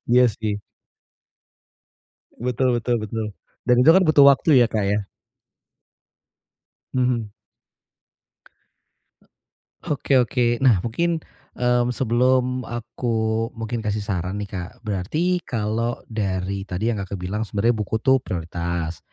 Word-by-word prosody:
Iya 125 Hz, +1 st, +6 dB
sih. 105 Hz, -1 st, -3 dB, 1.7 s
Betul 125 Hz, +1 st, 0 dB
betul 120 Hz, +1 st, 0 dB
betul. 110 Hz, +1 st, -3 dB, 0.4 s
Dan 125 Hz, -1 st, +4 dB
itu 155 Hz, -, +7 dB
kan 190 Hz, -, +5 dB
butuh 150 Hz, -3 st, +6 dB
waktu 140 Hz, 0 st, +5 dB
ya, 120 Hz, -, +5 dB
Kak, 105 Hz, -2 st, -1 dB
ya. 100 Hz, 0 st, 0 dB, 1.9 s
Mhm. 125 Hz, -4 st, 0 dB, 2.6 s
Oke 140 Hz, -2 st, +2 dB
oke. 120 Hz, 0 st, +1 dB
Nah 120 Hz, -9 st, +4 dB
mungkin, 165 Hz, +8 st, -1 dB, 0.3 s
mmm, 125 Hz, 0 st, +1 dB
sebelum 125 Hz, +1 st, +1 dB
aku 115 Hz, -1 st, -2 dB
mungkin 115 Hz, +1 st, -4 dB
kasih 105 Hz, -1 st, -2 dB
saran 95 Hz, -2 st, -3 dB
nih, 100 Hz, -, -7 dB
Kak, 90 Hz, -2 st, -5 dB
berarti 135 Hz, -, -1 dB
kalau 115 Hz, +1 st, -2 dB
dari 95 Hz, -2 st, -2 dB
tadi 100 Hz, +5 st, -1 dB
yang 110 Hz, -, -2 dB
Kakak 100 Hz, 0 st, -5 dB
bilang 105 Hz, +4 st, -2 dB
sebenarnya 110 Hz, +3 st, +1 dB
buku 105 Hz, 0 st, -3 dB
itu 130 Hz, -1 st, +4 dB
prioritas, 85 Hz, -3 st, -4 dB
115 Hz, 115 wpm, -23 LUFS, 100-125 Hz, 2.6 s, itu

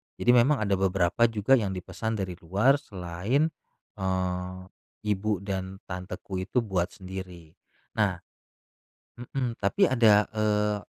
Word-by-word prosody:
Jadi 120 Hz, -, +3 dB
memang 125 Hz, +1 st, +4 dB
ada 100 Hz, -2 st, +1 dB
beberapa 95 Hz, +3 st, +3 dB
juga 115 Hz, +4 st, +3 dB
yang 95 Hz, -3 st, -2 dB
dipesan 110 Hz, +5 st, -4 dB
dari 90 Hz, -1 st, -6 dB
luar 105 Hz, -, +3 dB
selain, 100 Hz, -, -1 dB, 0.5 s
eee, 90 Hz, -1 st, -2 dB, 0.4 s
ibu 105 Hz, -1 st, -1 dB
dan 95 Hz, -1 st, -4 dB
tanteku 90 Hz, +1 st, -6 dB
itu 100 Hz, +6 st, 0 dB
buat 95 Hz, -5 st, 0 dB
sendiri. 90 Hz, -4 st, -8 dB, 0.5 s
Nah 100 Hz, -3 st, +3 dB, 1.0 s
mhm, 125 Hz, 0 st, -3 dB
tapi, 165 Hz, -, +2 dB
ada, 110 Hz, -5 st, +5 dB
eee, 105 Hz, -1 st, +1 dB
100 Hz, 120 wpm, -27 LUFS, 95-115 Hz, 1.0 s, ada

